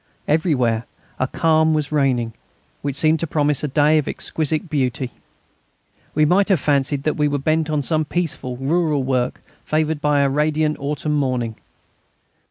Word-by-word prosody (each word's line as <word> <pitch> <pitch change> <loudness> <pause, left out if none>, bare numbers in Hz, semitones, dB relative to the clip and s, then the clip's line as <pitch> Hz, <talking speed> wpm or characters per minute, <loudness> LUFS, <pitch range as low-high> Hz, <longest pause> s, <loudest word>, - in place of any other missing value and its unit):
Everywhere 130 -8 +1 0.3
a 130 - +1
calm 160 +1 +2
was 150 -1 -1
reigning, 130 -6 +1 0.5
which 140 -2 -3
seemed 155 +2 +3
to 165 - -2
promise 150 -2 +1
a - - +1
day 150 +3 +3
of 150 - -3
exquisite 155 +2 -2
beauty. 130 -4 -1 1.0
We 155 0 +4
might 190 +6 +3
have 190 -5 +3
fancied 140 -1 0
that 155 - 0
we 150 -1 +2
were 145 0 0
bent 155 +3 0
on 150 -2 0
some 155 +1 0
peaceful 145 -7 -3
rural 150 +1 +1
work 130 -1 -1 0.2
favoured 155 -1 0
by 150 -1 +2
a 140 - +3
radiant 150 +2 +1
autumn 150 +2 -2
morning. 125 -6 -1
150 Hz, 160 wpm, -21 LUFS, 135-155 Hz, 1.0 s, We